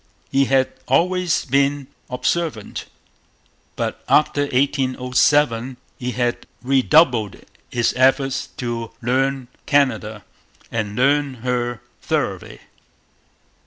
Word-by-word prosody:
He 135 0 +3
had 135 0 +2
always 180 +5 +1
been 140 +1 +1 0.2
observant. 125 -2 -2 0.9
But - - -3
after 145 -1 +3
1807 130 -1 +1 0.2
he 125 0 -3
had 120 -1 -2 0.2
redoubled 130 - +3 0.3
his 120 -1 +1
efforts 135 +1 +2
to 115 -2 -4
'learn 135 +1 0 0.2
Canada,' 110 -7 +1 0.5
and 105 -2 -3
learn 140 +1 +2
her 120 -2 -1 0.2
thoroughly. - - -3
130 Hz, 90 wpm, -21 LUFS, 120-140 Hz, 0.9 s, He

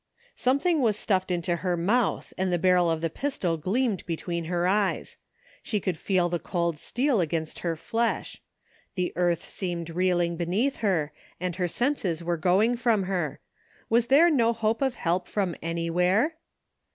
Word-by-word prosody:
Something 280 +5 +2
was 220 -4 +2
stuffed 190 -3 0
into 175 -1 0
her 180 0 -1
mouth 210 +7 0
and 185 0 -1
the 175 - +2
barrel 180 -1 +3
of 160 -1 -1
the 165 - 0
pistol 230 - -1
gleamed 200 - 0
between 170 0 -3
her 175 +1 0
eyes. 200 +1 0 0.5
She 210 - -1
could 185 -2 -2
feel 180 +1 +1
the 175 0 -2
cold 170 -4 -2
steel 245 - +1
against 160 -1 -2
her 170 -2 -1
flesh. 230 +7 -2 0.5
The 180 -2 -1
earth 175 -1 0
seemed 170 -3 -4
reeling 175 -1 +1
beneath 195 +11 0
her, 165 -8 0 0.3
and 180 -1 -2
her 180 -2 0
senses 190 - -1
were 175 0 0
going 190 +8 +2
from 230 -4 +2
her. 180 -6 -2 0.5
Was 235 +1 +3
there 315 +7 +6
no 235 -5 +3
hope 225 +1 0
of 265 -2 +1
help 175 -1 -1
from 190 -5 -1
anywhere 180 - +1
180 Hz, 165 wpm, -27 LUFS, 170-225 Hz, 0.5 s, there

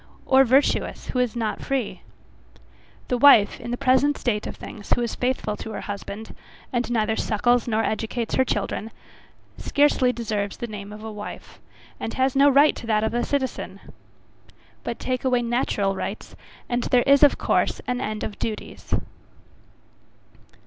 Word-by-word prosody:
or, 265 0 +6
virtuous, 270 +3 +1
who 250 - -1
is 250 -2 0
not 225 -2 -2
free? 265 -5 -2 1.1
The 250 - 0
wife, 235 -7 +6
in - - -7
the 245 - -2
present 275 +2 +3
state 210 -4 -1
of - - -6
things, 205 - -10
who - - -2
is 235 - -2
faithful 250 -4 -1
to - - -7
her - - -5
husband, 205 +2 -7 0.4
and 240 -1 0
neither 220 -2 +1
suckles 240 +3 +1
nor 225 -1 +1
educates 225 +1 -2
her 260 - +4
children, 215 -2 -2 0.7
scarcely 285 -3 +3
deserves 215 -4 -3
the - - -4
name 210 -2 -8
of 210 +1 -10
a 220 - -6
wife, 210 -1 -9 0.4
and 225 - -4
has 260 0 +1
no 280 +1 +6
right 285 +2 +5
to 230 - -8
that 215 -1 +2
of 220 - -1
a 240 - 0
citizen. 275 -2 -3 1.0
But - - -4
take 255 -1 -3
away 250 -2 +2
natural 230 -4 0
rights, 195 +2 -6 0.3
and 240 0 0
there 245 -1 +3
is 280 0 +5
of 290 - +6
course - - +1
an 250 -1 -2
end 215 -3 -3
of 205 - -6
duties. 215 -2 -4
240 Hz, 165 wpm, -24 LUFS, 215-260 Hz, 1.1 s, or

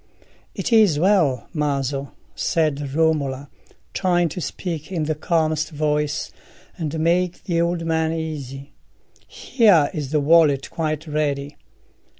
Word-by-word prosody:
"It 240 - -2
is 210 -9 +5
well, 170 - +2
Maso," 140 -3 -2 0.2
said 145 -4 -1
Romola, 145 -4 0 0.4
trying 175 -3 +1
to 180 - -6
speak 165 -2 -5
in 170 -4 -1
the 155 +1 0
calmest 155 0 0
voice, 150 -1 -1 0.4
and 160 -3 -4
make 175 +2 0
the 170 -2 0
old 170 0 -1
man 160 -1 0
easy. 145 -4 -6 0.5
"Here 205 - +3
is 150 -6 -4
the 150 +1 +1
wallet 145 -2 +3
quite 155 -1 -2
ready. 145 -2 -2
155 Hz, 125 wpm, -22 LUFS, 145-170 Hz, 0.5 s, is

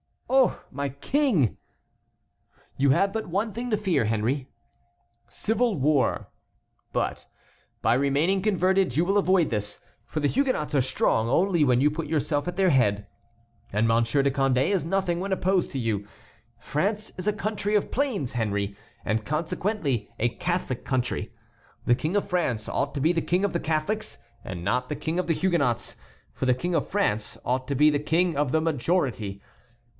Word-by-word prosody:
"Oh, 265 -2 +3
my 140 +1 -3
King!" 175 - +1 1.2
"You 135 0 +4
have 195 +8 +3
but 220 - -3
one 200 +6 -1
thing 240 +4 -4
to 215 - +2
fear, 180 - +1
Henry,—civil 125 - -3
war; 145 0 +1 0.6
but - - -2 0.6
by 115 - +4
remaining 140 +9 +2
converted 190 - +2
you 165 - +4
will 195 +3 +2
avoid 185 -4 +3
this, 105 -2 -3 0.2
for 155 +5 -4
the 145 - +2
Huguenots 255 - 0
are 140 - +4
strong 115 -3 +1
only 170 +3 +3
when 125 -1 +3
you 150 +2 +4
put 155 0 -4
yourself 145 0 0
at 175 - -3
their 190 -2 +3
head, 105 -7 +2 0.7
and 105 +2 +2
Monsieur 115 +4 +2
de 140 - +2
Condé 135 0 +2
is 195 -5 +1
nothing 180 -1 0
when 195 +1 -1
opposed 185 0 +1
to - - -2
you. 105 -4 -2 0.5
France 205 +8 -2
is 185 - -4
a 210 - +3
country 210 -1 -2
of 205 - +1
plains, 235 - -1
Henry, 100 -4 -1 0.3
and 110 0 0
consequently 155 - -1
a 120 - +1
Catholic 175 -2 -2
country. 125 -4 -1 0.5
The 120 - +4
King 155 +9 -1
of 205 - +1
France 145 - -1
ought 140 +1 -1
to 140 - -2
be 160 +4 +4
the 170 -2 0
king 180 +5 +1
of 200 - -2
the 170 - 0
Catholics 160 +8 -2 0.3
and 90 -7 -6
not 125 +6 0
the 150 - -2
king 160 +4 -2
of 180 - -1
the 165 - +3
Huguenots, 160 -11 0 0.3
for 130 - -3
the 125 - +4
King 175 +8 -3
of 160 - 0
France 110 - 0
ought 130 +1 -1
to 140 - -1
be 150 +3 +6
the 145 - +1
king 165 +3 +1
of 145 -3 +1
the 160 - +2
majority. 130 - -1
150 Hz, 175 wpm, -26 LUFS, 125-190 Hz, 1.2 s, be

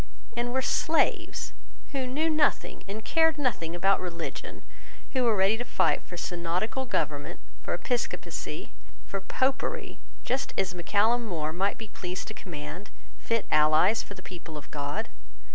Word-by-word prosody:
And 240 +1 0
were 260 +1 +1
slaves 320 +4 +2 0.4
who 265 -2 -1
knew 295 +6 +1
nothing 310 -2 +2
and 215 +2 -5
cared 320 -1 +4
nothing 195 - 0
about 195 +3 +4
religion, 170 -2 -5 0.5
who 260 -2 +3
were 230 -2 +5
ready 195 +3 +4
to 245 - -2
fight 245 - +2
for 175 - -9
synodical 180 +10 -1
government, 145 -11 -1 0.2
for - - -1
Episcopacy, 245 -2 -2 0.3
for 195 - -3
Popery, 265 +7 0 0.2
just 260 +2 -1
as 190 -1 +1
Mac 175 -2 -7
Callum 225 +4 +4
More 160 -5 -1
might 195 +4 +1
be 220 - -6
pleased 180 -2 -4
to - - -5
command, 180 0 -7 0.3
fit 230 -2 0
allies 155 +8 +5
for 200 - -9
the 185 - -11
people 170 -4 -8
of 145 - -10
God? 145 +8 -2
200 Hz, 155 wpm, -29 LUFS, 175-245 Hz, 0.5 s, were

